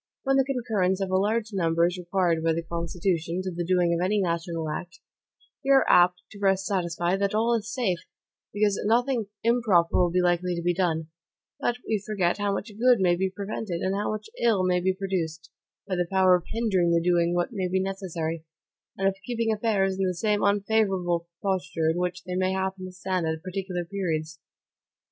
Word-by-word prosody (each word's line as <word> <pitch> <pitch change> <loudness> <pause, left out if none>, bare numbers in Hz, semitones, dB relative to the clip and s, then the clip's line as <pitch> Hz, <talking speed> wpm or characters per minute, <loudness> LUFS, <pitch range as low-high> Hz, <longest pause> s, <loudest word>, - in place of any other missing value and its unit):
When 270 0 +2
the 270 - +5
concurrence 220 -8 0
of 195 -1 -2
a - - +2
large 215 +3 0
number 170 -3 +2
is 175 +1 0
required 175 -2 0
by 165 0 +2
the 165 +1 -2
Constitution 170 +1 -2
to 185 - -3
the 175 0 -3
doing 175 -1 +2
of 170 +1 0
any 205 +3 +1
national 170 -3 -2
act, 175 +3 -6 0.6
we 270 - -3
are 270 -1 +6
apt 180 0 +5
to 200 - -11
rest 195 -1 +2
satisfied 175 -1 0
that 200 +1 0
all 230 +2 +2
is 225 -1 -2
safe, 210 -10 0 0.5
because 205 -1 +1
nothing 235 0 +2 0.2
improper 220 -8 +3
will 180 -1 +4
be 180 +2 +1
likely 180 0 +1
TO 170 - -4
BE 175 0 +2
DONE, 165 -3 -1 0.5
but 240 - 0
we 215 -3 0
forget 200 -3 0
how 205 0 0
much 205 +2 -3
good 245 -1 +5
may 180 -2 +3
be 190 +2 0
prevented, 195 -2 -4
and 190 - 0
how 205 +1 -1
much 215 - -5
ill 215 -5 +3
may 180 -1 +2
be 185 +1 +1
produced, 170 -5 -3 0.4
by 190 - -1
the 175 -1 0
power 190 -1 +5
of 175 -1 -3
hindering 205 -7 +1
the 170 0 +3
doing 175 0 +2
what 175 +6 -1
may 190 -4 -1
be 190 +1 0
necessary, 175 -4 -3 0.5
and 195 - +1
of 195 - +1
keeping 230 -1 0
affairs 200 -3 0
in 195 - +2
the 180 - -1
same 210 +3 0
unfavorable 195 -4 +1 0.2
posture 180 -4 0
in 165 - -3
which 180 0 -2
they 180 - -5
may 185 +1 +1
happen 190 0 -2
to 185 - -8
stand 185 -2 -2
at 160 0 -3
particular 185 -1 -4
periods. 160 -5 -3
185 Hz, 200 wpm, -26 LUFS, 175-205 Hz, 0.6 s, are